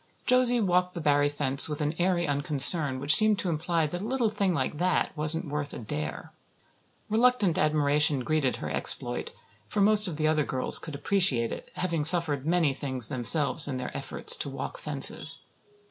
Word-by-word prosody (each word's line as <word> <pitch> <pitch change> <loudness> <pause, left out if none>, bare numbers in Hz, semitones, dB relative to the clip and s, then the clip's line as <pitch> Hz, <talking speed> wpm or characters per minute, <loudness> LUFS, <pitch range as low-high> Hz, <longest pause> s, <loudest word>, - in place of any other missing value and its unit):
Josie 250 -1 +3
walked 180 -3 -1
the - - -5
Barry 145 -2 0
fence 145 0 +1
with 150 - -6
an 150 0 -3
airy 175 -1 -1
unconcern 145 -1 +5
which 140 +3 +4
seemed 215 -1 +4
to 185 - -4
imply 165 0 -2
that 175 +4 -6
a - - -7
little 235 -1 -2
thing 200 -3 -2
like 145 -2 -4
that 180 -2 -2
wasn't 155 +3 -2
worth 145 0 -6
a - - -7
"dare." 150 +7 -7 0.7
Reluctant 220 -5 0
admiration 150 -2 0
greeted 150 -1 -2
her - - -7
exploit, - - 0 0.4
for 210 - -5
most 210 +1 +4
of 165 -4 -5
the 155 0 -1
other 155 -1 0
girls 130 -2 -1
could 155 -3 -9
appreciate 145 - +2
it, - - -9
having 170 -4 -3
suffered 155 -4 +2
many 165 -4 0
things 130 -4 -4
themselves 140 +4 +2
in 135 -3 -5
their 125 - -8
efforts - - 0
to - - -5
walk - - -8
fences. - - +1
155 Hz, 180 wpm, -25 LUFS, 145-180 Hz, 0.7 s, unconcern